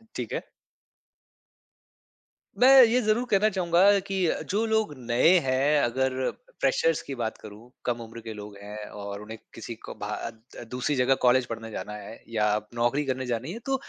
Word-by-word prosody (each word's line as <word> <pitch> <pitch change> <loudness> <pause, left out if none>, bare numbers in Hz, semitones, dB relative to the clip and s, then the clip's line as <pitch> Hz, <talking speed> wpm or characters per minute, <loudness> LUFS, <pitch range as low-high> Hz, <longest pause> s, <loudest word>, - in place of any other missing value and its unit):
ठीक - - -4
है। - - -4 2.1
मैं 265 +1 +9
ये 240 +1 +4
ज़रूर 215 +2 +1
कहना 210 +1 +4
चाहूँगा 190 +1 +4
कि 195 - -3 0.3
जो 210 +4 +1
लोग 220 -6 +1
नए 125 +9 +4
हैं 140 +3 +3
अगर 130 +1 0 0.3
फ्रेशर्स - - +2
की 135 - -6
बात 115 -3 -3
करूँ, 110 +3 -12 0.2
कम 120 -1 -1
उम्र 115 0 -9
के 110 0 -7
लोग 105 -1 -9
हैं 105 +1 -8
और 100 0 -7
उन्हें 110 +1 -8 0.2
किसी 115 +1 -7
को - - -7
भात 110 +3 -7
दूसरी 125 +4 -1
जगह 130 +1 +3
कॉलेज 125 +1 +5
पढ़ने 115 -1 -7
जाना 105 0 -6
है 105 +1 -9
या 110 -2 +1 0.3
नौकरी 120 +5 +1
करने 130 -1 -2
जानी 125 +4 -3
है। 230 - -7
तो 270 - +1
125 Hz, 170 wpm, -27 LUFS, 115-185 Hz, 2.1 s, मैं